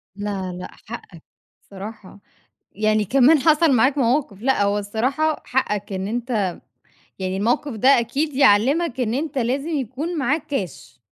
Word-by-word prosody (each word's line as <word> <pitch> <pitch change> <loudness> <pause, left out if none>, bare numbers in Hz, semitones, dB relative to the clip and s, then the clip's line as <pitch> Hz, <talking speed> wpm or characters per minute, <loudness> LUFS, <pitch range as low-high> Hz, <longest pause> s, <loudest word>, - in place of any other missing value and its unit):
لا 200 -3 -4
لأ، - - -8
حقك 185 -7 -10 0.4
الصراحة. 200 0 -10 0.5
يعني 215 0 +1
كمان 275 - +5
حصل 310 +2 +4
معاك 265 +4 +3
مواقف 240 -5 0
لأ، 260 -5 +2
هو 200 +1 +1
الصراحة 255 +10 -1
حقك 210 -6 -1
إن 190 +1 -3
أنت 230 -5 -1 0.7
يعني 190 0 -2
الموقف 240 +7 0
ده 225 +5 +2
أكيد 275 +5 -2
يعلمك 265 +3 +3
إن 230 -1 0
أنت 290 0 -2
لازم 265 +6 -1
يكون 300 +3 -3
معاك 290 +4 0
كاش، 205 - -5
240 Hz, 140 wpm, -22 LUFS, 205-280 Hz, 0.7 s, كمان